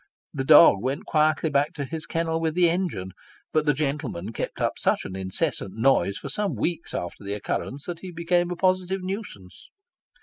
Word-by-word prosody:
The 135 - -2
dog 100 - +8
went 135 +5 -2
quietly 155 0 +2
back 145 +3 +2
to 145 -4 -4
his 155 +2 -6
kennel 165 0 -1
with 160 -1 -1
the 180 -1 +5
engine, 165 - -1 0.4
but 155 -1 +1
the 150 - +5
gentleman 140 - -3
kept - - -4
up - - -1
such - - +1
an 95 - -6
incessant 95 0 -2
noise 115 -4 +2
for - - -6
some 200 +7 -1
weeks 170 -1 -2
after 85 +3 -5
the 100 +1 -3
occurrence, 135 +6 -4
that 175 -2 -5
he 185 - -8
became 175 +1 +1
a 180 - -3
positive 185 +1 0
nuisance. 185 - -7
155 Hz, 190 wpm, -25 LUFS, 130-175 Hz, 0.4 s, dog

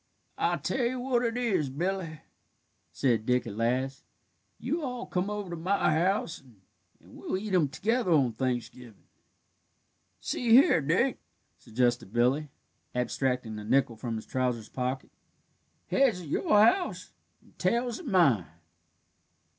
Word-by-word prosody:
"I'll - - +1
tell 265 - -2
you 250 +2 -1
what 245 -1 0
it 230 0 -1
is, 195 - 0
Billy," 165 +1 -3 0.7
said 115 +4 +1
Dick 125 0 +2
at 105 -3 -6
last; 130 +4 -1 0.5
"you 330 - -2
all 250 -3 -4
come 180 +2 -2
over 205 -3 -4
to - - -3
my 175 -1 +1
house, 175 +1 0 0.6
and - - -18
we'll - - -3
eat 205 +1 -5
him 170 -5 +4
together 225 - 0
on 140 -8 +3
Thanksgivin'." 125 -2 -4 1.2
"See 235 - -3
here, 245 - +6
Dick," 180 - +1 0.4
suggested 120 -3 0
Billy, 130 +6 +1 0.5
abstracting 125 -3 -1
a - - -7
nickel 125 +1 +2
from 115 +1 -4
his 110 - -6
trousers' 125 -4 -2
pocket; 130 +1 -3 0.7
"heads 250 -9 +2
at 165 - -9
your - - -2 0.2
house, 355 +10 0 0.3
and - - -26
tails 235 0 0
at 345 - -9
mine." 150 - +3
155 Hz, 140 wpm, -28 LUFS, -, 1.2 s, here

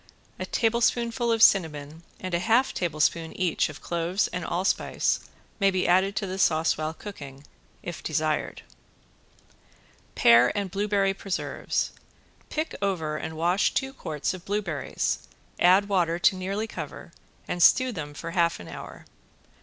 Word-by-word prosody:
A - - -4
tablespoonful 235 +1 +1
of 225 -1 +3
cinnamon 155 -4 +3 0.2
and 185 -1 -5
a 170 - +2
half 230 +7 +2
tablespoonful 165 -1 -1
each 180 -3 +1
of - - -11
cloves 170 +3 0
and 180 0 -4
allspice 185 +3 0 0.4
may 195 -1 +4
be 185 -1 0
added 190 +3 +3
to 210 - -1
the 190 0 -5
sauce 160 -3 +3
while 155 +1 -3
cooking 140 -8 -10 0.4
if - - -6
desired. - - -1 1.5
~PEAR 120 +1 +6
AND 200 -3 -2
BLUEBERRY 200 0 +1
PRESERVES~ 195 -1 -2 0.6
Pick 310 +1 -3
over 170 -6 -1
and 160 +1 -6
wash 175 +5 +1
two 265 0 -1
quarts 155 - -3
of 185 -2 -9
blueberries, 195 -8 -2 0.4
add 185 +3 +5
water 175 -4 +1
to 185 +2 +3
nearly 195 +4 -3
cover - - -8 0.4
and 175 - -3
stew 255 +8 +6
them 150 -8 -6
half 170 +1 0
hour. 85 -2 -9
185 Hz, 140 wpm, -26 LUFS, 160-200 Hz, 1.5 s, ~PEAR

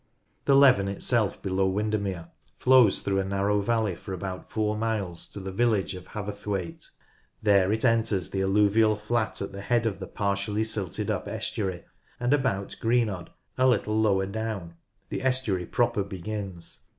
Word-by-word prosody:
The 140 - +5
Leven 130 -8 +6
itself 105 +2 0
below 95 0 +1
Windermere 100 -3 -2 0.3
flows 125 -5 +5
through 95 -1 0
a - - +1
narrow 100 +1 +1
valley 110 -2 +1
for 95 - -8
about 95 0 -6
four 105 -1 0
miles 105 -6 -2
to - - -7
the 95 0 -5
village 105 -3 +1
of 90 0 -9
Haverthwaite. 100 -3 -5 0.5
There 100 -2 +4
it 110 +3 0
enters 115 -5 +1
the 95 - -1
alluvial 105 +2 +3
flat 110 0 -1
at 100 - -5
the 100 0 -7
head 115 +3 +1
of 110 -4 -1
the - - -6
partially 100 +1 -1
silted 105 -5 -2
up - - -3
estuary, 95 -5 -3 0.4
and 125 +3 +2
about 120 -9 0
Green 115 0 +3
odd, 90 -3 -6 0.3
a 130 - +5
little 105 -3 +2
lower 100 -3 +3
down, 100 -4 -4 0.4
the - - -3
estuary 125 -9 0
proper 120 -4 +1
begins. 95 -2 -6
105 Hz, 160 wpm, -27 LUFS, 95-110 Hz, 0.5 s, Leven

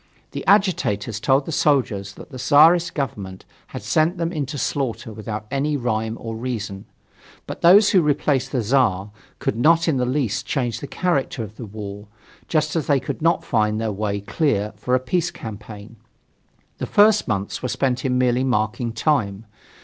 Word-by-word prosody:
The - - -5
agitators 150 - +2
told 135 +3 +2
the - - -5
soldiers 120 -11 +1
that - - -12
the 130 - -8
Czarist 160 +7 +5
Government 100 -10 -4 0.2
had - - -8
sent 160 +4 +1
them 165 0 -1
into 145 -4 -4
slaughter 125 -5 -2
without 110 0 -6
any 145 +2 0
rime 110 -2 -2
or 115 -1 -6
reason. 110 -5 -5 0.6
But - - -7
those 195 +5 +7
who 190 -5 +5
replaced 140 -3 0
the 125 -4 0
Czar 105 -5 +1 0.3
could - - -2
not 165 +7 +3
in 155 -5 +2
the 125 -1 0
least 125 -4 -1
change 125 -5 -1
the 140 - -7
character 140 -10 -1
of 110 0 -10
the 115 -1 -8
war, 100 0 -8 0.4
just 155 0 0
as 160 - -1
they 140 -2 +3
could 130 - -5
not 165 +2 +2
find 110 -2 +1
their 110 -1 -1
way 100 0 -2
clear 105 -3 -1
for 125 +5 0
a - - +2
peace 170 +7 -1
campaign. 105 0 -10 0.8
The - - -3
first 210 +1 +4
months 100 -1 -2
were 125 - -3
spent 130 0 -1
in 125 -1 +1
merely 125 0 +2
marking 120 -1 -1
time. 115 -6 0
125 Hz, 175 wpm, -22 LUFS, 110-150 Hz, 0.8 s, those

